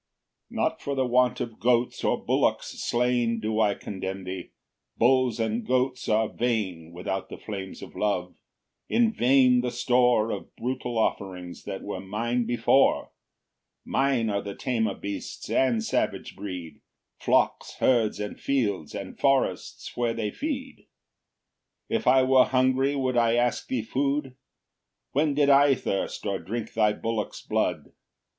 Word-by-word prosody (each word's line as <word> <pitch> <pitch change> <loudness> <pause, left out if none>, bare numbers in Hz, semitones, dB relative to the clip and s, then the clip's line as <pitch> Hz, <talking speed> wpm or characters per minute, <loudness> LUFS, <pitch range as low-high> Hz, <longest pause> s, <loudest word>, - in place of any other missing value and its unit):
5 - - -13
Not - - 0
for 140 - -3
the 130 -1 +1
want 125 0 +2
of 115 - -5
goats 120 0 +1
or - - 0
bullocks - - +1
slain 120 -1 +1
Do 110 0 -1
I 105 -2 +3
condemn 95 -1 -5
thee; 90 -1 -6 0.5
bulls 125 -1 +3
and 115 +1 -1
goats 130 +1 0
are 110 +1 +3
vain 100 -10 -2
Without 95 +2 -4
the - - -8
flames 95 -3 -7
of - - -11
love: 90 -4 -1 0.6
in 230 -1 +3
vain 125 - +4
the 125 - -1
store 120 -2 +2
Of - - -6
brutal 125 -1 -3
offerings 90 -5 -2
that - - -5
were - - -4
mine 115 +5 -1
before; 120 +3 +3 0.7
Mine 130 -5 +1
are 100 0 0
the 100 -1 -6
tamer 110 -6 -1
beasts 100 0 -6
and 120 -4 +2
savage - - -1
breed, 90 -5 -7 0.4
Flocks, - - +1
herds, 115 -5 +2
and 105 -1 -5
fields, 105 - -1
and 100 -2 -7
forests 135 -1 0
where 120 -1 0
they 105 -2 -2
feed. 275 -3 -4
6 - - -28 1.0
If 230 -1 -1
I 130 0 +6
were 130 -1 +5
hungry 130 +2 +2
would 130 -2 0
I 115 -1 +3
ask 120 0 0
thee 125 -4 -1
food? 135 +2 -1 0.8
When 145 +1 +1
did 145 -1 +4
I 140 0 +6
thirst, 100 -5 -3
or 100 -2 -1
drink 115 +2 -5
thy 105 -1 +3
bullocks 110 0 -3
blood? - - -1
120 Hz, 150 wpm, -26 LUFS, 105-130 Hz, 1.0 s, I